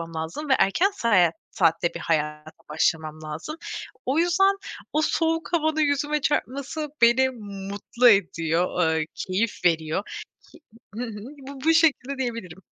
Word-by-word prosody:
lazım 165 - -5
ve - - +6
erken 350 - +3
saat 185 - +3 0.2
saatte 170 -1 +2
bir - - -6
hayata 150 -1 -2 0.2
başlamam 155 0 0
lazım. 155 - -6 0.5
O 270 +5 +1
yüzden 390 +3 +3 0.4
o 305 - +2
soğuk 325 +2 0
havanın 315 -1 +1
yüzüme 295 0 +1
çarpması 285 +2 -2
beni 240 +3 +5 0.4
mutlu 240 +4 +3
ediyor, 170 -3 +2
eee, 155 - -1
keyif 190 0 -2
veriyor. 165 +2 +1 0.9
Y 240 - -3
hı - - -4
hı. 210 -2 -8 0.3
Bu 275 -1 -9
bu 325 - +5
şekilde 285 -5 +2
diyebilirim. 230 -9 -5
230 Hz, 135 wpm, -25 LUFS, -, 0.9 s, ve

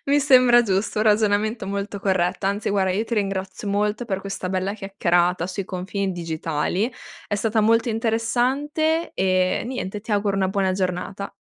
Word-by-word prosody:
Mi 285 +1 +3
sembra 255 -4 +6
giusto, 200 0 -1
un 215 - +2
ragionamento 215 0 +2
molto 200 +1 -4
corretto. 190 -1 0
Anzi, 200 +2 -1
guarda, 190 -2 +1
io 210 +4 0
ti 235 - -3
ringrazio 195 -1 -3
molto 210 +3 0
per 195 -4 -3
questa 195 -2 -5
bella 190 +1 -1
chiacchierata 180 -3 0
sui 195 +1 -4
confini 190 +1 -3
digitali. 165 - -2 0.3
È 205 - -2
stata 220 +1 +1
molto 230 +2 +3
interessante, 255 +8 0
e 185 -1 +1
niente, 210 -5 -4
ti 215 +1 -5
auguro 200 -1 +1
una 190 -1 +1
buona 190 -1 0
giornata. 185 +1 -3
200 Hz, 160 wpm, -23 LUFS, 190-225 Hz, 0.3 s, sembra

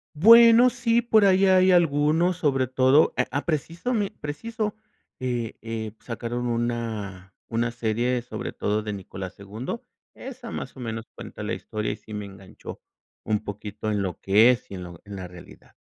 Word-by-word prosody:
Bueno, 230 +7 +8
sí, 235 -1 +1
por 220 -3 +4
ahí 195 0 +4
hay 185 0 +5
algunos, 165 +1 +3
sobre 135 -6 +1
todo, 130 +4 +4
a 125 - +3
a 145 - -1
precisame 175 - -1
preciso, 215 +8 -4 0.4
eh 120 -3 -3
eh, 110 -1 -4
sacaron 120 +1 -4
una 115 -6 -3
una 115 +1 -1
serie 120 +2 -1
sobre 120 - -6
todo 105 +1 -1
de 105 -1 -4
Nicolás 95 -1 -7
II, 110 - -5 0.4
esa 250 -3 -9
más 135 - -6
o - - -10
menos 115 -1 -5
cuenta - - -9
la - - -3
historia 105 0 -4
y - - -4
sí 105 0 -13
me 105 -1 -4
enganchó 95 -1 -11 0.4
un 105 -1 -1
poquito 105 +1 -6
en 105 -2 0
lo 90 -3 -4
que 105 +5 +5
es 125 0 -3
y 100 - -7
en 90 - -7
lo 85 -1 -11
en 100 -1 -9
la 95 -2 -6
realidad. 90 -1 -15
120 Hz, 175 wpm, -25 LUFS, 105-175 Hz, 0.4 s, Bueno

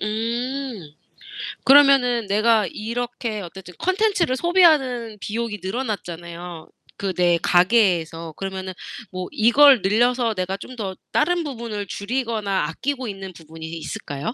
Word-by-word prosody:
으 - - -2
음. 230 - -3 0.7
그러면은 265 -5 +5
내가 215 +1 +3
이렇게 230 +1 -4
어쨌든 180 0 -10
컨텐츠를 375 -7 +1
소비하는 270 - +3
비용이 220 -1 -4
늘어났잖아요, 175 -6 -5 0.3
그 195 -2 -2
내 175 -1 +3
가계에서. 175 -4 +2
그러면은 190 -1 -5 0.4
뭐 185 -1 -5
이걸 255 +2 +6
늘려서 235 +3 +2
내가 185 0 -3
좀 255 +5 -10
더 195 -5 -5 0.2
다른 345 +2 +2
부분을 230 -7 -5
줄이거나 210 -6 -2
아끼고 260 +7 -3
있는 195 -2 -7
부분이 160 -1 -11
있 165 +1 -6
있을까요? 145 +10 -5
215 Hz, 305 characters per minute, -22 LUFS, 185-250 Hz, 0.7 s, 이걸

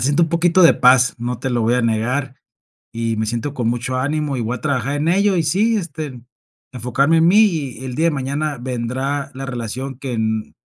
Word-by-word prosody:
siento 145 +7 +2
un - - -5
poquito 170 +2 +3
de 165 - +8
paz, 125 0 +4
no 120 0 -3
te 135 - -2
lo 120 -1 0
voy 115 +2 +2
a 125 - +1
negar. 125 +4 -1 0.6
Y 115 -1 -2
me 110 0 -1
siento 120 +6 -3
con 120 -5 -1
mucho 120 +2 -2
ánimo 145 0 -1
y - - -3
voy 115 +3 -2
a - - -11
trabajar 140 -1 -1
en 150 +3 -1
ello. 195 +2 +3
Y 165 - +1
sí, 210 +9 +2
este, 155 - -5 0.5
enfocarme 130 +6 +1
en 160 - +4
mí 195 +4 +5
y 145 - 0
el 130 -1 -5
día 160 +5 +1
de 170 - +3
mañana 140 +1 -2
vendrá 130 +3 -3
la 135 +1 -6
relación 125 +2 -5
que, 130 -4 -4
mm, 110 -1 -2
130 Hz, 220 wpm, -19 LUFS, 120-155 Hz, 0.6 s, de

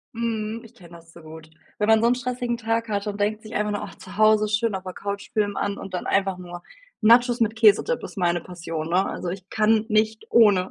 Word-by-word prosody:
Mhm, 225 -1 -3
ich 230 +1 -16
kenne 170 -6 -14
das 165 0 -19
zu 170 - -15
gut. 160 0 -12 0.3
Wenn 210 - +1
man 220 0 +5
so 230 - +3
'n 240 - +4
stressigen 245 -1 -3
Tag 230 0 -1
hat 205 -1 -2
und 205 0 -4
denkt 210 +1 0
sich 215 0 -10
einfach 210 0 0
nur, 205 - -3
ach, - - -8
zu 185 +1 -12
Hause 215 0 +4
schön 215 0 0
auf 190 - -6
der 185 -1 -7
Couch, 200 +1 -6
Film 205 -2 0
an 200 0 -2
und 190 -1 -7
dann 180 - -4
einfach 195 -1 0
nur 175 -1 -9 0.4
Nachos 240 +2 +4
mit 225 0 +1
Käsedip 220 - +3
ist - - -9
meine 175 -2 +1
Passion, 165 -3 -6
ne? 185 +3 +2
Also, - - -5
ich 190 +1 -8
kann 220 0 +2
nicht 215 0 +1
ohne. 200 -5 +4
210 Hz, 240 wpm, -24 LUFS, 185-225 Hz, 0.4 s, man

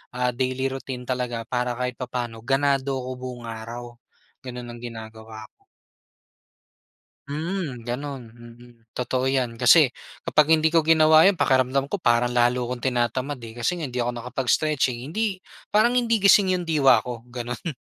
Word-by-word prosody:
ah, 125 0 0
daily 130 +2 -2
routine 130 -1 -6
talaga 125 -2 -3
para 125 +1 -2
kahit 125 0 -4
papa'no, 120 -3 -4
ganado 135 +2 0
ako 130 - -5
buong 125 -1 -7
araw. 120 +2 -8 0.5
Gano'n 125 -1 -7
ang 120 - -10
ginagawa 110 -2 -9
ko. - - -69 1.7
Mm, 155 -4 -4
gano'n, 135 +3 -5
mm, 120 +1 -15 0.2
totoo 125 +1 -1
yan. 125 -4 -1
Kasi, 130 +2 +6 0.3
kapag 150 -1 +3
hindi 160 0 +3
ko 165 - +5
ginawa 160 +1 +6
'yon, 200 - +4
pakiramdam 135 -2 +1
ko 205 - -2
parang 120 -4 +2
lalo 120 +1 +2
akong 125 +1 -4
tinatamad 125 +2 -1
eh, 115 - -8
kasi 120 +9 0
nga, 170 - -6
hindi 125 -3 -4
ako 120 0 -1
nakapag-stretching, 130 +1 -1
hindi 215 +1 -1 0.3
parang 235 +4 +3
hindi 230 -4 0
gising 195 -2 +5
yung 180 - -3
diwa 155 -5 +4
ko, 120 -1 -7
gano'n. 120 +2 -6
125 Hz, 155 wpm, -24 LUFS, 120-145 Hz, 1.7 s, Kasi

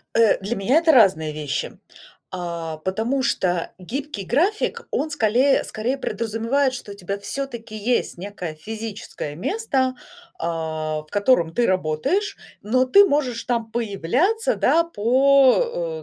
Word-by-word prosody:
Э, 230 -1 +5
для 205 +5 -3
меня 235 +9 +2
это 330 0 +5
разные 185 - +4
вещи. 150 -2 -4 0.6
А, 170 -3 -5
потому 220 - -1
что 175 -6 0
гибкий 230 +3 -5
график- 405 - 0
он 310 +1 -1
сколее 260 +1 +3
скорее 240 +5 -3
подразумевает, 230 +4 0
что 230 -5 -7
у 200 - -8
тебя 200 +1 -4
всё-таки 230 +1 -6
есть 215 -2 -1
некое 180 -4 -6
физическое 210 -4 -7
место, 260 - -1 0.4
а, 160 -2 -3
в - - -26
котором 200 -6 +2
ты 240 - +2
работаешь, 185 - 0 0.3
но 255 +5 +2
ты 400 +10 +7
можешь 270 -8 0
там 230 -3 -2
появляться, 250 - 0
да, 335 - +3
по, 280 - +3
230 Hz, 130 wpm, -22 LUFS, 185-275 Hz, 0.6 s, ты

